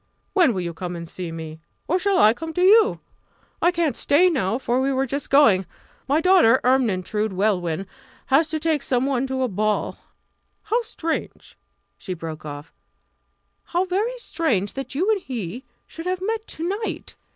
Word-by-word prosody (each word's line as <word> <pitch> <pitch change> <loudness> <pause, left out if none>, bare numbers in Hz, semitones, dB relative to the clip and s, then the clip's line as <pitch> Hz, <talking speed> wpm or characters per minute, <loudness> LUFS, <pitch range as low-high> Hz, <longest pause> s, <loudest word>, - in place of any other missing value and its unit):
When 335 - +4
will 185 - -1
you 170 -1 -4
come 175 +1 -5
and 170 -1 -7
see 175 0 -6
me 160 -1 -7 0.3
or 360 +4 +1
shall 390 0 +1
I 215 +1 +6
come 320 +6 -7
to 360 - -1
you? 435 +4 +5 0.6
I 345 - +5
can't 335 -4 0
stay 355 +6 +3
now, 225 - 0
for 255 -1 0
we 270 +1 +1
were 265 0 +1
just 275 +2 -3
going; 215 - +5 0.4
my 285 +3 +3
daughter, 335 -10 +5
Ermyntrude 220 -4 +1
Welwyn, 185 -3 0 0.4
has 300 +4 +3
to 315 - -1
take 315 -2 0
some 255 -1 0
one 270 -1 0
to 260 0 -1
a - - +1
ball. 215 0 -1 0.6
How 450 +3 +1
strange" 330 -8 -5 0.4
she 185 - -5
broke 160 -2 -7
off 145 +1 -8 0.9
"how 360 +2 0
very 420 +7 -1
strange 250 - -1
that 270 0 -6
you 355 +8 +1
and 415 -3 0
he 240 - -6 0.2
should 330 +2 -8
have 370 0 -1
met 440 +3 -3
to 330 +2 -5
night! 410 +4 -4
265 Hz, 175 wpm, -23 LUFS, -, 0.9 s, I